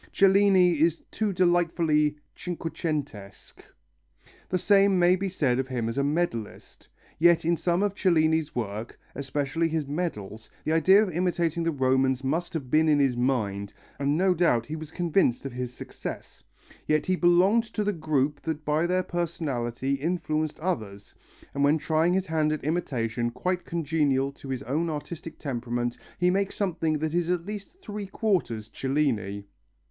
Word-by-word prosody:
Cellini 190 -4 +4
is 165 0 +2
too 215 -2 -1
delightfully 170 -4 +2 0.2
cinquecentesque. 150 - -5 0.9
The 185 - +1
same 195 +1 +4
may 180 +1 +5
be 195 +1 -2
said 135 -9 0
of 135 - -1
him 125 -4 -2
as 115 +4 -2
a - - +2
medallist. 145 -8 -3 0.3
Yet 170 0 +5
in 170 +1 +3
some 175 +3 0
of 205 -2 0
Cellini's 160 -5 +2
work, 110 -1 -4
especially 145 +4 -1
his 160 -2 -1
medals, 115 - -4
the - - -1
idea 190 +6 +6
of 195 - -3
imitating 170 -1 0
the 165 - +1
Romans 130 -1 +1
must 165 +6 -2
have 130 -6 -4
been 155 +1 +4
in 150 - +4
his 135 -3 +2
mind, 110 -6 -1 0.2
and 140 +2 +1
no 185 +1 +3
doubt 160 -10 +2
he 155 - -5
was 155 -1 -7
convinced 165 -6 +1
of 135 - -5
his 125 0 -4
success. - - -8 0.4
Yet 155 0 +2
he 185 - +1
belonged 185 +6 +4
to 220 -1 -3
the 205 0 0
group 150 -3 0
that 160 -2 -4
by 155 +3 +1
their 185 +1 +1
personality 140 -8 -2
influenced 155 0 -2
others, 110 - -4 0.4
and 140 - 0
when 145 +2 +4
trying 160 +3 +1
his 190 0 0
hand 155 -2 +1
at 155 - -3
imitation 120 -7 -1
quite 180 +9 -2
congenial 145 -4 0
to 140 0 -12
his 130 -2 -3
own 155 +7 -1
artistic 160 +2 -6
temperament 120 -3 -3 0.2
he 180 0 +3
makes 195 +1 0
something 165 -5 0
that 155 +1 -2
is 175 0 0
at 175 -1 0
least 210 - -8
three 205 -1 -6
quarters 180 - -1
Cellini. 115 -8 -1
155 Hz, 165 wpm, -27 LUFS, 135-175 Hz, 0.9 s, idea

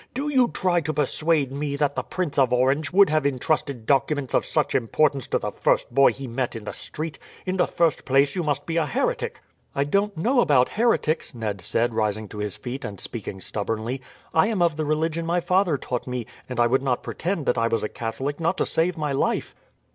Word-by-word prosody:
"Do 285 +3 -1
you 260 -4 +4
try 180 -6 +1
to 155 -1 -3
persuade 150 0 +1
me 140 +1 -2
that 140 -1 0
the - - 0
Prince 175 -6 -2
of 130 -2 +4
Orange 135 +4 +2
would 195 -3 +6
have 155 -1 +2
intrusted 140 -2 -1
documents 140 +1 +1
of - - +2
such - - +1
importance 135 +2 +1
to - - +1
the - - -3
first - - +1
boy 140 0 +6
he 135 - -7
met 125 0 -2
in 115 - -6
the - - -5
street? 155 0 -6 0.3
In 185 +1 -1
the 180 - +3
first 165 -3 +1
place 135 +1 +3
you 180 - 0
must 145 -3 -1
be 165 0 -2
a 160 -2 +2
heretic." 140 - -1 0.3
"I 140 - +2
don't 200 +6 0
know 245 +11 +2
about 130 - +4
heretics," 185 - +1
Ned 105 -5 -3
said, 115 +6 0
rising 110 -1 -1
to 105 - -8
his 105 -2 -3
feet 125 +6 -6
and 105 -5 -6
speaking 100 -4 -4
stubbornly. 115 +6 -3 0.3
"I 160 - +4
am 220 -4 -1
of 170 -3 +2
the 155 0 -2
religion 160 +2 0
my 170 +2 +1
father 175 -2 +2
taught 125 -1 -4
me, 125 -2 -3 0.2
and 125 -2 -4
I 120 - +5
would 130 +3 +2
not 130 -3 0
pretend 170 -4 -3
that 125 - +2
I 115 - +2
was 115 -2 0
a - - 0
Catholic, 120 +8 -4
not 170 +3 0
to - - +1
save 170 +2 0
my 150 -2 -1
life." 135 - 0
140 Hz, 225 wpm, -24 LUFS, 125-165 Hz, 0.3 s, would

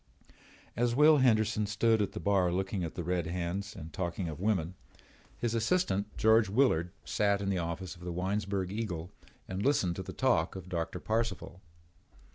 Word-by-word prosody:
As 120 +1 +1
Will 150 +2 +7
Henderson 110 -5 +3
stood 110 +1 +2
at 100 -1 -1
the 105 - -5
bar 95 -4 +2
looking 95 +1 -1
at 80 - -5
the 90 - -3
red 90 -1 -1
hands 90 +4 -3
and 80 -3 -9
talking 85 +1 -3
of 75 -2 -6
women, 95 -4 0 0.6
his 120 -2 -1
assistant, 115 - +1
George 110 -1 +4
Willard, 100 -7 +2 0.2
sat 100 +7 +1
in 100 -1 -2
the 95 - 0
office 85 +2 -4
of 85 - -17
the 90 - -4
Winesburg 95 +1 -2
Eagle 95 -5 -4 0.4
and 95 +2 -3
listened 100 -11 +2
to - - -3
the - - -7
talk 120 -13 +1
of 95 -1 -8
Doctor 85 -3 -3
Parcival. 110 -4 -2
95 Hz, 175 wpm, -31 LUFS, 90-110 Hz, 0.6 s, Will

